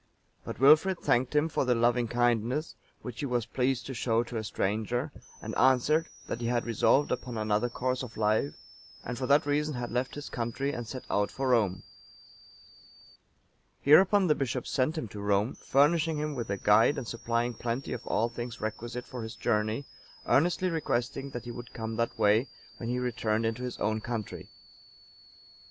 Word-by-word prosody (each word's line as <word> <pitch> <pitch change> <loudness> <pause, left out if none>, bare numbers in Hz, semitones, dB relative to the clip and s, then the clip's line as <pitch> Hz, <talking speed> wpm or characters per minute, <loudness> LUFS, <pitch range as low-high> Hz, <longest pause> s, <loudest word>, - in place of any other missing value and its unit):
But - - -7
Wilfrid 155 +7 +6
thanked 125 0 +1
him 150 +2 +4
for 160 - 0
the 125 -2 +2
loving 120 +1 +2
kindness 120 +5 0 0.3
which 120 -2 -7
he 145 - -2
was 120 -3 0
pleased 125 0 -1
to 135 - -5
show 115 -1 +1
to 120 -1 -6
a 110 - -2
stranger, 110 +7 -1 0.3
and - - -5
answered, 130 +6 +3 0.2
that 120 - -5
he 115 - -1
had 120 0 0
resolved 120 +5 +3
upon 125 -2 -3
another 110 +2 +1
course 125 +1 -2
of 125 -3 -8
life, 105 -9 +1 0.5
and 125 - -3
for 130 +1 -3
that 145 +1 +4
reason 150 0 0
had 120 -1 -4
left 125 +2 -2
his 145 0 -6
country 125 +4 -2
and 120 -1 -5
set 130 +2 -6
out 105 0 +1
for 135 -1 -2
Rome. 100 -7 +2 2.0
Hereupon 190 +7 +6
the 155 - +4
bishop 130 -3 -2
sent 140 +5 0
him 140 - -3
to 100 +1 -8
Rome, 100 +3 +1
furnishing 155 +3 +2
him 150 0 -2
with 120 -6 -4
a 100 - -1
guide 105 +9 +4
and 130 -4 -4
supplying 115 +1 -1
plenty 120 +4 -3
of 120 - -5
all 115 +3 +1
things 120 0 -6
requisite 115 +3 -5
for 125 - -7
his 110 0 -6
journey, 110 +3 0 0.4
earnestly 175 +4 +2
requesting 135 -3 -2
that 120 -2 -7
he 120 - -5
would 120 0 -9
come 110 0 -4
that 115 0 -1
way, 105 +5 +3 0.3
when 115 - -5
he 125 - 0
returned 115 -3 -1
into 115 +2 -2
his 125 -1 -4
own 110 +1 -1
country. 115 -3 -5
120 Hz, 180 wpm, -29 LUFS, 115-135 Hz, 2.0 s, Wilfrid